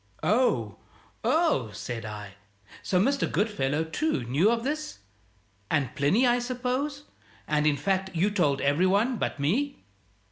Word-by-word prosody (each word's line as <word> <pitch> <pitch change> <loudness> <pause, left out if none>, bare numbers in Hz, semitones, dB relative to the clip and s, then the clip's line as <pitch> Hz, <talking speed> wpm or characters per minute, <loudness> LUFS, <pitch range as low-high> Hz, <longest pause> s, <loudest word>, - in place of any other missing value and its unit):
"Oh, 245 +4 +1 0.5
oh!" 315 - +2
said 110 +2 -5
I. 105 -2 -7 0.5
"So 180 - +1
Mr. 275 +8 +1
Goodfellow, 160 -9 0
too, 160 - -1
knew 140 - +2
of 230 0 0
this? 305 +3 -3 0.7
And 145 -4 0
Plinny, 185 - +2
I 245 0 +3
suppose? 255 +4 -2 0.4
And, 150 0 +2
in 145 -1 +2
fact, 190 +5 0
you 190 +6 +2
told 150 -9 +1
every 145 +6 +3
one 220 +6 +2
but 155 - -3
me?" 245 - -1
195 Hz, 140 wpm, -27 LUFS, -, 0.7 s, I